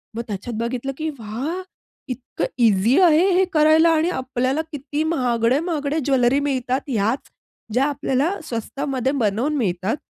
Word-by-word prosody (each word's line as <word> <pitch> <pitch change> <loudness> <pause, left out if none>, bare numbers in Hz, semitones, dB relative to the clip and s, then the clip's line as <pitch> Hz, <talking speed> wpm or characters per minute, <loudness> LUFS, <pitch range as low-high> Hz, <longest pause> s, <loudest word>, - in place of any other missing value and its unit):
मग 235 - -2
त्याच्यात 215 +3 -5
बघितलं 245 +3 -2
की 315 0 -2
"वाह! 250 - -4 0.5
इतकं 250 -1 -4 0.2
ईझी 215 - +3
आहे, 340 0 +5
हे 380 +1 +4
करायला 315 +2 +5
आणि 320 +3 +2
आपल्याला 260 0 -1
किती 290 +1 -3
महागडे, 250 -4 +1
महागडे 310 -3 -1
ज्वेलरी 265 -1 +3
मिळतात." 260 +1 -2
याच 225 +2 -1 0.4
ज्या 255 +4 +3
आपल्याला 285 +2 0
स्वस्तामध्ये 265 +1 -2
बनवून 225 +9 0
मिळतात 195 0 -1
265 Hz, 135 wpm, -22 LUFS, 235-305 Hz, 0.5 s, आहे